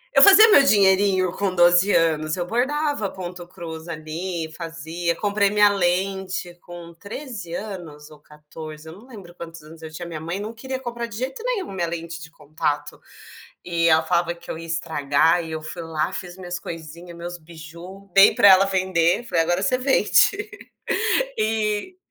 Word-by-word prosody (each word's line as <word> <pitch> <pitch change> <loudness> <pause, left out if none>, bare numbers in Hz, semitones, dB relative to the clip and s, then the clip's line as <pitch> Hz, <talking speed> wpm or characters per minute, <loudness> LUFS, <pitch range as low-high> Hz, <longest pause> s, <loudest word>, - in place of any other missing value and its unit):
Eu - - +7
fazia 405 +2 +9
meu 285 - +8
dinheirinho 195 -6 +3
com 195 -1 -2
12 175 +3 +5
anos, 155 -1 +1
eu 175 - -2
bordava 260 - -1
ponto 180 -1 -8
cruz 165 -2 -9
ali, 165 +2 -5
fazia. 165 +1 -4
Comprei 205 -1 +1
minha 210 0 +5
lente 190 -1 -1
com 175 -1 -11
13 200 - -8
anos 175 -9 -8
ou 150 -1 -16
14, 155 +1 -11
eu 160 - -9
não 215 +7 -16
lembro 200 -9 -12
quantos 165 -2 -10
anos 160 +1 -14
eu 160 - -9
tinha, 175 +2 -7
minha 165 -2 -6
mãe 170 +4 -4
não 215 +2 -6
queria 260 +3 -6
comprar 235 -2 -5
de 210 -2 -9
jeito 260 - -4
nenhum 475 - -2
minha 175 -3 -2
lente 165 0 -6
de 165 - -10
contato 150 -1 -4 0.6
e 170 -1 0
ela 160 0 +4
falava 170 +1 0
que 170 0 -13
eu - - -5
ia 165 - -8
estragar 165 0 +1
e 160 - -8
eu 160 -1 -5
fui 155 +2 -7
lá, 160 +2 -2
fiz 180 -1 -7
minhas 180 -2 -6
coisinha, 170 +1 -9
meus 175 +1 -7
biju, 170 +4 -12
dei 195 0 +7
para 200 - +6
ela 190 0 +7
vender, 185 -1 +1
falei: 165 -7 +1
"Agora 175 +3 0
você 255 +6 +1
vende". 395 +10 +2 0.9
E 215 - -1
175 Hz, 175 wpm, -22 LUFS, 165-200 Hz, 0.9 s, fazia